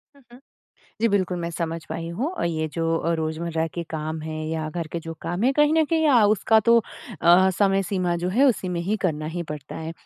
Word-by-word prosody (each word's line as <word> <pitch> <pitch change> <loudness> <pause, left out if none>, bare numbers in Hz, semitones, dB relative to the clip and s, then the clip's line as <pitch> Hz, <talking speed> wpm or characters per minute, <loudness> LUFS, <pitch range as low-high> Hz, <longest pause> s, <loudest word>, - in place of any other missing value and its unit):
हुँ, 280 - -20
हुँ। 245 - -14 0.6
जी 230 - +3
बिल्कुल 185 -3 0
मैं 170 0 -3
समझ 165 -1 -4
पाई 165 0 -4
हूँ 230 - -2
और 370 - -3
ये 160 -2 -1
जो 165 0 0
अ, 170 - -1
रोज़मर्रा 160 +1 -2
के 170 - -3
काम 155 0 -4
हैं 155 0 -5
या 160 -1 -3
घर 170 +1 -4
के 170 - -2
जो 165 0 -7
काम 175 +4 -3
हैं 265 - +4
कहीं 295 +1 +4
न 320 -1 +4
कहीं 320 0 +1
अ, 245 -6 +5
उसका 220 +1 +3
तो 235 +2 +5 0.4
अ, 175 +3 +6
समय 195 -1 +3
सीमा 180 -2 -1
जो - - +1
है 235 +9 +3
उसी 215 -7 +1
में 175 -1 -2
ही 195 +5 -1
करना 155 -3 -1
ही 175 - -2
पड़ता 150 -2 -8
है। 160 0 -5
175 Hz, 240 wpm, -24 LUFS, 160-210 Hz, 0.6 s, अ